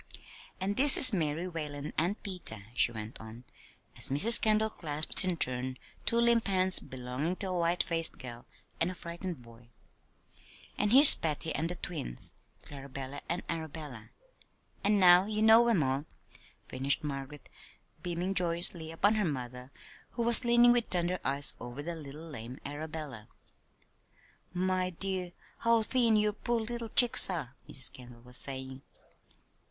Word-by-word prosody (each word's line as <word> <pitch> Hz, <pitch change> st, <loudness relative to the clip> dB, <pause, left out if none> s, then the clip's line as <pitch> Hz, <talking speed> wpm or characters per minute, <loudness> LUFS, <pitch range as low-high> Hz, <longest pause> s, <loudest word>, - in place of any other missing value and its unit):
"And 195 Hz, +2 st, -4 dB
this 280 Hz, +1 st, +6 dB
is 255 Hz, -3 st, +9 dB
Mary 165 Hz, -1 st, -3 dB
Whalen, 150 Hz, -4 st, -8 dB
and 180 Hz, +6 st, -3 dB
Peter," 175 Hz, -, -3 dB
she 120 Hz, -, +4 dB
went 110 Hz, -1 st, -10 dB
on, 110 Hz, +2 st, -13 dB, 0.5 s
as -, -, +1 dB
Mrs. 200 Hz, -, +6 dB
Kendall 220 Hz, 0 st, +1 dB
clasped 155 Hz, +1 st, +2 dB
in 180 Hz, -2 st, -2 dB
turn 130 Hz, -1 st, -2 dB, 0.3 s
two 230 Hz, -, +2 dB
limp 235 Hz, -1 st, +2 dB
hands 185 Hz, -1 st, +3 dB
belonging 130 Hz, +7 st, -6 dB
to 190 Hz, 0 st, -6 dB
a -, -, -4 dB
white 170 Hz, +1 st, -1 dB
faced 165 Hz, -1 st, -2 dB
girl 120 Hz, -2 st, -11 dB, 0.3 s
and 165 Hz, -, 0 dB
a 185 Hz, -, -8 dB
frightened 170 Hz, -4 st, -9 dB
boy. 115 Hz, 0 st, -19 dB, 1.1 s
"And 210 Hz, 0 st, -2 dB
here's 275 Hz, +4 st, +11 dB
Patty 160 Hz, 0 st, -3 dB
and 165 Hz, +2 st, -4 dB
the 180 Hz, -, -5 dB
twins, 155 Hz, -, -6 dB, 0.3 s
Clarabella 140 Hz, -1 st, -10 dB
and 175 Hz, +2 st, -4 dB
Arabella; 155 Hz, -8 st, -8 dB, 0.7 s
and 205 Hz, 0 st, +1 dB
now 180 Hz, +1 st, +5 dB
you 215 Hz, 0 st, -3 dB
know 225 Hz, +2 st, +6 dB
'em 205 Hz, -10 st, +1 dB
all," 135 Hz, +2 st, -3 dB, 0.6 s
finished 135 Hz, +4 st, 0 dB
Margaret, 140 Hz, 0 st, -8 dB, 0.5 s
beaming 175 Hz, +2 st, -5 dB
joyously 170 Hz, -2 st, -1 dB
upon 200 Hz, +6 st, 0 dB
her 215 Hz, -2 st, -2 dB
mother 125 Hz, -4 st, -7 dB, 0.4 s
who 235 Hz, -, -4 dB
was 235 Hz, +1 st, +7 dB
leaning 240 Hz, 0 st, +3 dB
with 240 Hz, -1 st, 0 dB
tender 180 Hz, 0 st, -1 dB
eyes 140 Hz, +1 st, +1 dB
over 120 Hz, +4 st, -9 dB
the 170 Hz, +2 st, -6 dB
little 155 Hz, +1 st, -11 dB
lame 125 Hz, -4 st, -10 dB
Arabella. 145 Hz, -6 st, -9 dB, 1.2 s
"My 185 Hz, 0 st, -2 dB
dear, 185 Hz, 0 st, -5 dB, 0.3 s
how 230 Hz, -1 st, +1 dB
thin 235 Hz, -1 st, +1 dB
your 210 Hz, 0 st, 0 dB
poor 235 Hz, +3 st, -4 dB
little 230 Hz, 0 st, -6 dB
cheeks 240 Hz, -1 st, +7 dB
are," 150 Hz, -9 st, -6 dB
Mrs. 130 Hz, -1 st, +1 dB
Kendall 120 Hz, -2 st, -15 dB
was 125 Hz, 0 st, -7 dB
saying. 130 Hz, -1 st, -5 dB
165 Hz, 150 wpm, -28 LUFS, 135-200 Hz, 1.2 s, here's